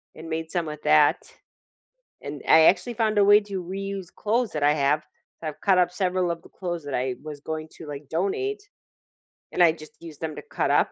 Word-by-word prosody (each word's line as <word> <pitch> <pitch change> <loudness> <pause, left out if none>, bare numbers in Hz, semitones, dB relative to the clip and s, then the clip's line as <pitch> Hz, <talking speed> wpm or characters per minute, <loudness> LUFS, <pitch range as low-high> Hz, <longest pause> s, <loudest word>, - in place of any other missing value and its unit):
and 160 +1 -9
made 160 0 -3
some 175 -2 -1
with 150 0 -7
that, 150 -1 +5 1.1
and, 145 0 -7
I 160 - +8
actually 200 +8 +3
found 215 -1 +1
a 200 - +6
way 205 +1 +7
to 200 -3 -5
reuse 195 0 -5
clothes 230 +2 0
that 150 -2 -3
I 145 +1 +5
have, 145 +1 +2 0.4
so 160 - -4
I've 150 - -8
cut 190 -2 +4
up 175 -1 +3
several 180 -2 0
of 165 -1 -4
the - - -16
clothes 175 -4 -5
that 140 - -5
I 125 0 0
was 150 -2 -8
going 155 0 -5
to, 160 - -10
like, 145 -1 -8
donate, 395 - -1 0.9
and 175 - +4
I 165 - +7
just 155 -2 -13
use 160 -3 -10
them 160 -2 -5
to - - -8
cut - - 0
up, - - +3
165 Hz, 220 wpm, -25 LUFS, 150-195 Hz, 1.1 s, I